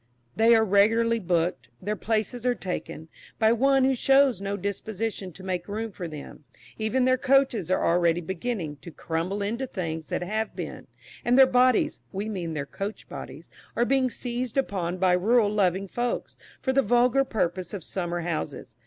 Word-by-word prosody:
They 230 +1 +6
are 220 0 +4
"regularly 225 +3 +3
booked." 175 - -1
Their 210 +3 -2
"places 220 +2 -2
are 250 -1 +2
taken" 175 -5 -5 0.3
by 220 0 +4
one 270 +3 +3
who 265 +1 +4
shows 270 -4 +3
no 200 0 -2
disposition 200 0 -4
to 190 - -12
make 180 -2 -3
room 220 +2 -4
for 180 -2 -6
them; 150 -1 -9 0.4
even 235 +4 +1
their 255 0 +3
coaches 265 - +2
are 185 - +1
already 170 0 +3
beginning 190 -3 -4
to 170 - -11
crumble 170 +5 -3
into 235 +6 -2
things 165 -7 -4
that - - -2
have 215 +4 -2
been; - - -7 0.4
and 245 +1 +3
their 265 - +9
bodies 255 -1 +3
(we 205 +2 -3
mean 175 -6 -4
their 140 -2 -2
coach 200 +9 -6
bodies) - - -9 0.2
are 240 - +2
being 265 0 +2
seized 245 +1 -4
upon 185 -9 -1
by 185 -1 +3
rural 210 +4 +3
loving 195 -1 +1
folks, 240 +5 -3 0.3
for 260 - +1
the 275 - +4
vulgar 245 +3 +3
purpose 185 -7 -2
of 200 -5 -6
summer 175 -1 -3
houses. 155 -8 -4
210 Hz, 175 wpm, -26 LUFS, 180-240 Hz, 0.4 s, their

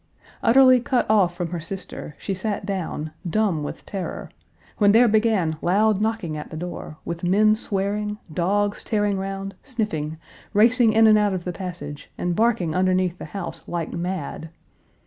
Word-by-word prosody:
Utterly 255 +1 +6
cut 245 +1 0
off 185 -5 +3
from 175 -1 -3
her 175 - -3
sister, 165 -3 -7
she 195 - -3
sat 200 +1 -3
down, 175 -6 -3 0.2
dumb 200 -5 +1
with 145 - -6
terror, 195 -3 -5 0.5
when 205 -1 +5
there 240 +2 +6
began 215 -7 +2
loud 205 +3 +2
knocking 215 -8 -1
at 150 - -6
the 160 - -7
door, 170 -2 -6
with 170 0 -5
men 210 +4 +4
swearing, 210 0 -2 0.2
dogs 205 +5 0
tearing 205 -3 0
round, 195 0 -4
sniffing, 165 - -3 0.4
racing 230 +2 +5
in 225 0 +6
and 215 -1 +6
out 205 -2 +2
of 180 - -4
the 180 - -4
passage 165 -6 -7
and 175 -1 -1
barking 220 -7 +1
underneath 185 0 +1
the - - -6
house 175 +3 -6
like 170 -2 -3
mad. 170 -2 -4
195 Hz, 165 wpm, -23 LUFS, 175-215 Hz, 0.5 s, Utterly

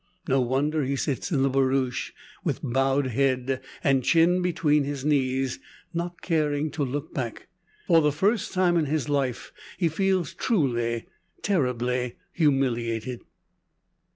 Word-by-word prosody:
No 135 -2 +3
wonder 140 +5 +1
he 135 +1 -1
sits 135 -1 -2
in 135 -5 +2
the 135 - +3
barouche, 130 -1 +1 0.3
with - - -2
bowed 135 +2 +1
head, 130 +1 0 0.2
and 135 -4 +3
chin 170 +4 +4
between 150 -4 +2
his 140 -1 -4
knees, 135 -3 +1 0.3
not 170 +1 -4
caring 155 -3 0
to 150 - -2
look 140 +4 -4
back. 120 -5 -5 0.4
For 165 -3 +5
the 150 -1 +3
first 200 +9 +1
time 180 -2 +2
in 160 - +2
his 150 0 -1
life 135 -4 -1 0.3
he 170 -3 +2
feels 185 -1 0
truly, 120 - 0 0.4
terribly 125 - 0 0.2
humiliated. 125 -6 0
140 Hz, 135 wpm, -26 LUFS, 130-160 Hz, 0.4 s, For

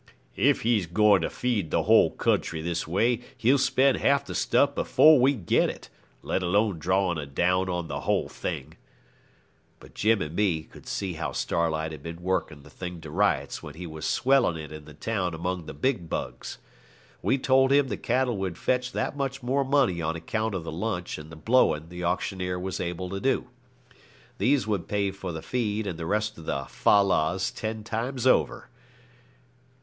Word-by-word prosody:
'If - - +3
he's 110 -6 +1
going 100 +2 +4
to - - -1
feed 115 -10 -1
the - - +1
whole - - +5
country 80 - 0
this 85 -1 -2
way, 115 +8 +1 0.2
he'll 130 +5 +3
spend 130 +1 +3
half 140 0 +2
the - - -6
stuff 140 0 +2
before 155 +1 +5
we 135 +3 +4
get 95 -9 +2
it, - - -9 0.3
let - - -1
alone 95 0 +1
drawing 90 0 +1
a 75 - -5
down 90 +6 +1
on 90 -2 -2
the 70 -1 -4
whole - - 0
thing.' - - -6 1.0
But - - -16
Jim 110 0 +2
and 75 +2 -7
me 90 -6 +1
could - - -16
see 95 -3 -3
how 80 -1 -4
Starlight 80 -1 -1
had 75 -3 -8
been 85 +3 -8
working 85 -6 -2
the 75 - -15
thing 90 +1 -7
to 80 -2 -9
rights - - 0
while 75 - -9
he 90 +2 -7
was 80 -2 -5
swelling 130 -10 +3
it 80 -1 -8
in 75 -1 -9
the 75 -1 -13
town 90 -1 -2
among 90 0 -3
the - - -6
big 90 - -1
bugs. 60 0 -5 0.6
We 135 - +2
told 135 0 +3
him 140 -1 +4
the - - -1
cattle 125 -2 0
would 95 -3 -3
fetch 125 0 -1
that - - -2
much 135 -1 -3
more 135 +3 +1
money 130 -11 +2
on 80 0 -1
account 110 +5 -2
of 90 - -3
the 80 - -6
lunch 90 0 -3
and 75 +1 -11
the - - -9
blowing 80 -4 +2
the 90 0 -7
auctioneer 90 +1 -1
was 95 +1 -4
able 90 +1 -4
to 95 - -3
do. 130 +1 0 0.9
These 135 0 +2
would 105 -5 -2
pay 100 -1 0
for 95 -2 -6
the 80 -1 -6
feed 110 -3 -1
and 90 -4 -4
the 80 - -4
rest 105 0 -1
of 80 - -12
the 70 0 -2
fal 100 +9 +3
lals 90 +3 +1
ten 110 0 -4
times 120 +4 -3
over. 130 - +2
95 Hz, 195 wpm, -27 LUFS, 85-120 Hz, 1.0 s, whole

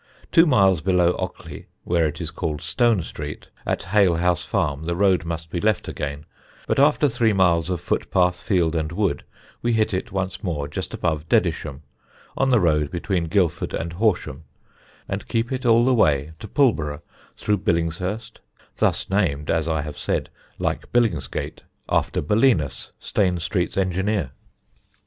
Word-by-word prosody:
Two 165 +1 +6
miles 95 - +4
below 90 -1 +3
Ockley 95 -1 -6 0.2
(where 85 -2 +2
it 75 0 -6
is 80 -3 -4
called 80 -2 -4
Stone 115 0 +2
Street), 75 -1 -7 0.2
at - - -1
Halehouse 90 -3 +2
Farm, 80 -8 -1
the 85 +1 -1
road 95 -2 +2
must 80 -1 -5
be 85 - -2
left 105 -2 +1
again, 70 +1 -5 0.4
but - - 0
after 145 +1 +4
three 115 -4 +2
miles 90 -3 +3
of 90 -2 -1
footpath, 90 -1 0
field, 85 -6 +1
and 80 -1 -1
wood 85 -5 -1 0.4
we 120 0 +1
hit 110 -1 +1
it 95 - -3
once 95 0 -3
more 75 -7 -2
just 75 - -5
above 80 -1 -2
Dedisham, 70 +1 0 0.5
on 135 - +1
the 125 -3 +5
road 75 -5 +2
between 90 0 -1
Guildford 90 -1 0
and 85 0 -4
Horsham, 90 - 0 0.6
and - - -4
keep 115 +3 -1
it 130 -1 -2
all 115 +1 +5
the 130 - +4
way 75 - +2
to 110 - -8
Pulborough, 80 - +1 0.3
through 105 -2 0
Billingshurst, 90 +5 -2 0.4
thus - - +1
named, 80 -8 0
as 80 -1 0
I 80 -3 0
have 75 -1 -7
said, - - -2 0.3
like - - -3
Billingsgate, 105 - -1 0.3
after - - 0
Belinus, 85 - +1
Stane 90 -3 0
Street's 90 +1 -2
engineer. 95 -4 0
90 Hz, 160 wpm, -23 LUFS, 80-105 Hz, 0.6 s, Two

